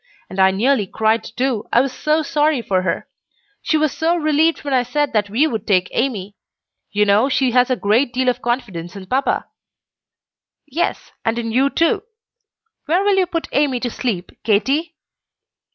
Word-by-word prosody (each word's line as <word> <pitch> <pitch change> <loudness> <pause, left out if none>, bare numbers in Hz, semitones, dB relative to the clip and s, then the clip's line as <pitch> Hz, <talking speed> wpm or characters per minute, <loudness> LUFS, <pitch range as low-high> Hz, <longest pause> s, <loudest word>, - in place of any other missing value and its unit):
And 190 - -6
I 190 0 +6
nearly 215 +2 +1
cried 220 +3 +1
too, 250 -4 -2
I - - +5
was 260 0 0
so 305 +1 0
sorry 295 -3 +1
for 190 -3 +1
her. 185 - -2 0.5
She 315 - +1
was 305 -2 +1
so 330 +2 +1
relieved 315 0 +1
when 285 -2 -2
I 255 - +4
said 290 +3 -1
that 210 -2 +1
we 240 +9 +2
would 225 -9 -3
take 185 -3 +2
Amy. 210 -6 -2 0.6
You 210 0 +2
know 210 +6 +3
she 260 -2 +1
has 250 +1 +3
a 255 - +2
great 235 +4 +1
deal 255 +1 -1
of 250 0 +1
confidence 200 -8 -3
in 195 -1 -8
papa." 260 +8 0 1.2
"Yes, 305 +4 -3
and 225 +1 0
in 230 -1 -3
you 265 +4 +3
too. 335 +7 +1 0.9
Where 350 +6 +2
will 405 -1 +2
you 370 -1 +3
put 335 -2 -3
Amy 275 -3 +1
to 245 - -2
sleep, 200 -9 -3
Katy?" 275 +10 +1
250 Hz, 180 wpm, -19 LUFS, 215-295 Hz, 1.2 s, I